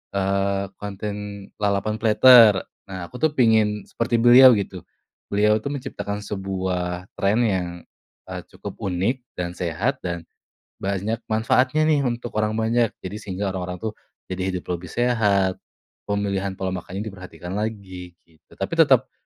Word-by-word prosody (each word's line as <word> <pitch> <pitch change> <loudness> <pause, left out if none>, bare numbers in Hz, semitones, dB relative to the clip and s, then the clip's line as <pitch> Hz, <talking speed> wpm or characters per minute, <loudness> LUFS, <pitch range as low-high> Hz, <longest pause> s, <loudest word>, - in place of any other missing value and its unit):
eee, 100 0 0
konten 100 0 -6
lalapan 105 +1 0
platter. 110 -2 +7 0.2
Nah 95 -2 -6
aku 125 - -8
tuh 155 -1 +2
pengen 110 -4 +3
seperti 115 +1 -2
beliau 120 +1 +8
gitu. 95 -3 -5 0.4
Beliau 105 +1 +3
tuh 110 - -6
menciptakan 105 -6 -5
sebuah 95 -2 -3
tren 100 +4 +2
yang, 95 -6 +1 0.6
eee, - - -4
cukup - - -9
unik, 100 +8 -1
dan 90 -1 -3
sehat, 85 -2 -2
dan 85 -1 -4 0.6
banyak 100 +3 -2
manfaatnya 125 +7 +2
nih 150 -4 +2
untuk 120 0 -3
orang 110 0 0
banyak, 115 +1 +2 0.2
jadi 95 +3 -5
sehingga 95 0 -3
orang-orang 90 -1 -4
tuh 110 - -1 0.4
jadi 95 0 -3
hidup 90 -1 -4
lebih 90 - -10
sehat, 105 -6 +1 0.5
pemilihan 100 -1 -1
pola 95 0 -3
makannya 95 +2 -5
diperhatikan 90 -4 -8
lagi 95 -4 -5
gitu, 80 -2 -23
tapi - - -4
tetap, - - +5
100 Hz, 140 wpm, -23 LUFS, 95-110 Hz, 0.6 s, beliau